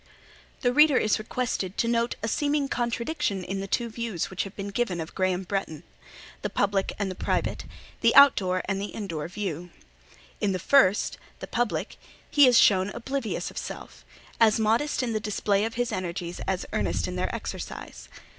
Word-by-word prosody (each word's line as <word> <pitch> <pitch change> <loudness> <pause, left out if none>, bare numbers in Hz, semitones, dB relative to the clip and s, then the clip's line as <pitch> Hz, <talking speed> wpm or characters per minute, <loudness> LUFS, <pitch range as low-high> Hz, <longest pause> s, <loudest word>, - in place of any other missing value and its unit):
The 245 -2 +2
reader 300 -1 +6
is 215 +1 +2
requested 215 -4 -3
to 230 - +1
note 235 0 +1
a - - 0
seeming 285 +4 0
contradiction 240 - -2
in 195 +2 -4
the 195 - -4
two 235 +4 0
views 225 -7 -4
which 185 - -2
have 195 - -10
been 200 0 -5
given 200 -4 -1
of 160 0 -6
Graham 185 -1 0
Bretton—the 175 -4 -6
public 200 -1 0
and 190 -2 -3
private—the - - -1
out 280 -1 +9
door 185 -1 -1
and 195 -1 -2
the 205 - -6
in 215 - -4
door 160 -5 -4
view. 180 -3 -5 0.7
In 200 -2 +1
the - - 0
first, 205 0 +3 0.2
the - - -7
public, 240 -2 -2 0.3
he 290 -2 +7
is 245 -2 +6
shown 190 -1 +5
oblivious 270 +6 -3
of - - -5
self; - - -8 0.4
as 220 -1 +5
modest 230 +7 +1
in 235 -2 -1
the 215 - 0
display 205 -1 0
of 225 - -4
his 245 0 -1
energies, 175 -2 -4
as 190 -1 -1
earnest - - 0
in - - -5
their - - -1
exercise. - - -7
210 Hz, 175 wpm, -26 LUFS, 190-240 Hz, 0.7 s, out